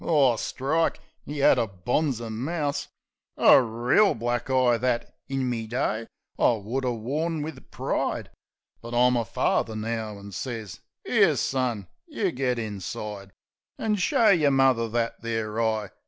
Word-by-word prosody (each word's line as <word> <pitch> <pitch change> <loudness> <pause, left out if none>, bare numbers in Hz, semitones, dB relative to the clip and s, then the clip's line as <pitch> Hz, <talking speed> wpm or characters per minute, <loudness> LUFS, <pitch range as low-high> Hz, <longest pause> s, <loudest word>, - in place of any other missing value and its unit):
Oh, 140 -7 +4
strike! 155 +8 -1 0.3
'E 145 -1 -2
'ad - - +6
a 115 - +1
bonzer 115 - -1
mouse! 145 +5 -2 0.5
A - - +7
reel 120 - +2
black 120 +2 -2
eye, 130 -2 +3
that, 120 0 -1 0.2
in 135 -1 -1
me 115 -3 -2
day, 115 -2 -1 0.3
I - - +5
would 115 +5 -3
'a' 125 - +1
worn 150 +8 -2
wiv 150 -5 -8
pride. - - -2 0.5
But 115 +1 -6
I'm 125 +1 +4
a 120 - +1
father 110 +1 0
now, 110 -1 -3
an' 100 0 -10
sez, 110 0 -6
" - - -57
'Ere, - - +4
son, 120 -7 -1 0.2
you 210 - -1
git 125 -2 -1
inside 105 -1 -5 0.5
An' 220 -1 0
show 210 +3 +3
yer 155 -6 +4
mother 130 -4 +3
that 115 +1 -2
there 115 -1 -2
eye. 110 -3 -1
120 Hz, 155 wpm, -26 LUFS, 110-135 Hz, 0.5 s, A